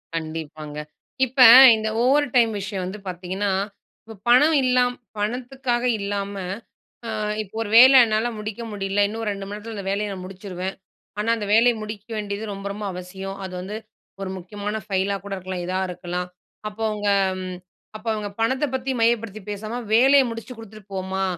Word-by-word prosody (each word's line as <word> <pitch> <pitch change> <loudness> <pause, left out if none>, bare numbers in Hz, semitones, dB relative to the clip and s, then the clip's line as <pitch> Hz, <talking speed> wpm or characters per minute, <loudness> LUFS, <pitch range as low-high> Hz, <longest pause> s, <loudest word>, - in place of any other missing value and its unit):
கண்டிப்பாங்க. 155 -2 -6 0.5
இப்ப 260 +2 -8 0.4
இந்த 220 0 -2
ஓவர் 285 +3 +3
டைம் 230 -2 +5
விஷயம் 195 -1 -4
வந்து 200 +3 -6
பாத்தீங்கன்னா, 185 +3 -2 0.5
இப்போ 225 -1 -10
பணம் 295 +6 +6
இல்லாம் 250 -1 +2 0.2
பணத்துக்காக 245 +3 -2
இல்லாம, 200 0 -3 0.7
ஆ - - -5 0.3
இப்போ 200 +1 -15
ஒரு 210 - -5
வேல 260 +2 +9
என்னால 220 +2 0
முடிக்க 215 +2 -5
முடியல 195 0 -1
இன்னும் 225 +1 -5
2 200 -1 -5
மணி 205 - -6
நேரத்தில 220 +1 -8
இந்த 195 - -6
வேலைய 205 +1 -1
நான் 185 -1 -7
முடிச்சுருவேன். 190 -1 -6 0.4
ஆனா 220 - -2
அந்த 210 -2 -4
வேலைய 235 +1 +5
முடிக்க 215 0 -7
வேண்டியது 205 0 -4
ரொம்ப, 195 0 -7
ரொம்ப 210 +1 -6
அவசியம். 190 +2 -7
அது 185 - -7
வந்து 200 +4 -6 0.5
ஒரு 190 - -4
முக்கியமான 205 +4 -5
ஃபைலா 195 0 0
கூட 200 - -7
இருக்கலாம். 185 -1 -5
இதா 185 +1 -1
இருக்கலாம். 180 0 -4 0.4
அப்போ 215 +2 -8
அவங்க 210 -1 -2 0.4
ம். 185 -1 -5 0.4
அப்போ 215 +2 -7
அவங்க 210 -1 -4
பணத்தை 260 +6 +1
பத்தி 260 +1 -2
மையப்படுத்தி 225 -2 +1
பேசாம, 215 +3 -5 0.2
வேலைய 270 +4 +6
முடிச்சு 230 +2 -7
குடுத்துட்டு 215 -2 -13
போமா 190 0 -2
205 Hz, 165 wpm, -23 LUFS, 190-230 Hz, 0.7 s, வேல